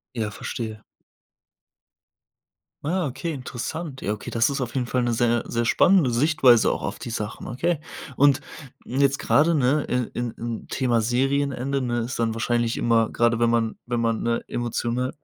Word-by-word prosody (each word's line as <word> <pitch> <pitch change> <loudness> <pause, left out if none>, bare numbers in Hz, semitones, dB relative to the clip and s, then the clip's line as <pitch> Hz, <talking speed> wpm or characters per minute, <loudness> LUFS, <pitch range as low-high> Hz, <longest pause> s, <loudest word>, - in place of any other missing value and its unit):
Ja, 110 -3 -2
verstehe. 110 0 -6 2.0
Ah, 175 +3 0
okay, 135 +5 -4
interessant. 135 +2 -5
Ja, 105 - -1
okay, 105 - -6
das 115 +4 +2
ist 140 - -2
auf 125 -2 -4
jeden 130 -2 0
Fall 125 +1 0
'ne 120 -1 0
sehr, 120 0 +2
sehr 120 0 -1
spannende 175 +3 +4
Sichtweise 125 -2 +4
auch - - -2
auf - - -4
die - - -7
Sachen, 110 -1 -5
okay. 165 +7 -1 0.4
Und, 140 -1 +5 0.4
mm, 130 +3 -3
jetzt 140 0 +3
gerade, 160 +4 +3
ne? 145 +1 +2
In 125 -1 -1
in 120 -1 -2
in 115 -1 -6
Thema 120 -3 +1
Serienende, 135 +3 0
ne, 120 -2 -1
ist 120 +2 -4
dann 115 -1 0
wahrscheinlich 120 0 0
immer, 115 -1 +2
gerade 115 -1 +2
wenn 120 0 +3
man 115 -1 0
wenn 120 -1 -1
man, 115 -1 0
ne, 115 0 -1
emotional 120 +1 -2
120 Hz, 175 wpm, -24 LUFS, 115-135 Hz, 2.0 s, Und